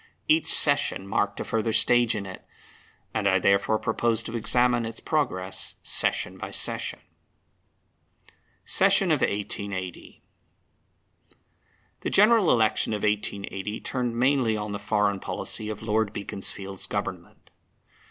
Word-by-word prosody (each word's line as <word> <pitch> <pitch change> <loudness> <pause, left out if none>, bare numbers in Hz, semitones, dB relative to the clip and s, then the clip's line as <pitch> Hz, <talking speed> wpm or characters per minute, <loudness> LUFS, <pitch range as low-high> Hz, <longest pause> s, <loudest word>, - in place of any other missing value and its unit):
Each 315 +1 +3
session 145 -9 +4
marked 100 +1 -1
a - - -2
further 115 0 -1
stage 120 +1 +3
in 100 -2 -4
it; 95 -1 -9 0.7
and 105 -2 0
I 95 -1 +4
therefore 100 +3 +2
propose 115 +1 0
to 115 - -7
examine 120 +1 +2
its 115 0 -5
progress 95 -12 -2
session - - 0
by - - -6
session. - - -3 1.6
Session - - +3
of - - +2
1880. 100 -2 -4 1.8
The - - -3
General 210 -2 +5
Election 110 -1 +2
of 105 - -3
1880 105 0 -2
turned 120 -3 -3
mainly 125 -3 +2
on 105 0 -4
the 100 - -4
foreign 105 -1 0
policy 105 +2 -4
of 110 0 -6
Lord 110 -1 0
Beaconsfield's 100 -1 -3
Government. - - -6
110 Hz, 125 wpm, -26 LUFS, 100-120 Hz, 1.8 s, General